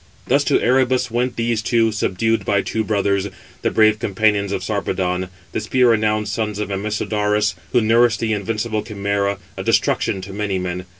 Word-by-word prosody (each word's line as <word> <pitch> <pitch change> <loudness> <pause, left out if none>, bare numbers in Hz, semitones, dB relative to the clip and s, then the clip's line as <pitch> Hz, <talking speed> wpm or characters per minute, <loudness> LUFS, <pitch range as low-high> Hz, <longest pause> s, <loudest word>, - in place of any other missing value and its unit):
Thus 140 +3 +2
to 140 - +3
Erebus 125 -1 +2
went 125 +2 -1
these 115 -1 0
two, 115 0 +2
subdued 110 +2 0
by 100 -1 +1
two 110 - -2
brothers, 100 -2 0 0.3
the - - +1
brave 110 -1 +3
companions 100 -1 +1
of 95 - -2
Sarpedon, 95 -3 -2 0.2
the - - -2
spear 125 +3 +3
renowned 110 -1 +1
sons 105 0 -2
of 105 -1 -3
Amisodarus, 105 +1 0 0.2
who 120 - +3
nourished 115 0 +3
the 110 -1 0
invincible 110 +1 -2
519 110 -2 -9
Chimæra, 100 0 0 0.2
a - - -4
destruction 95 - +1
to 95 +1 -8
many 100 -1 -2
men. 90 0 -4
105 Hz, 175 wpm, -20 LUFS, 100-115 Hz, 0.3 s, to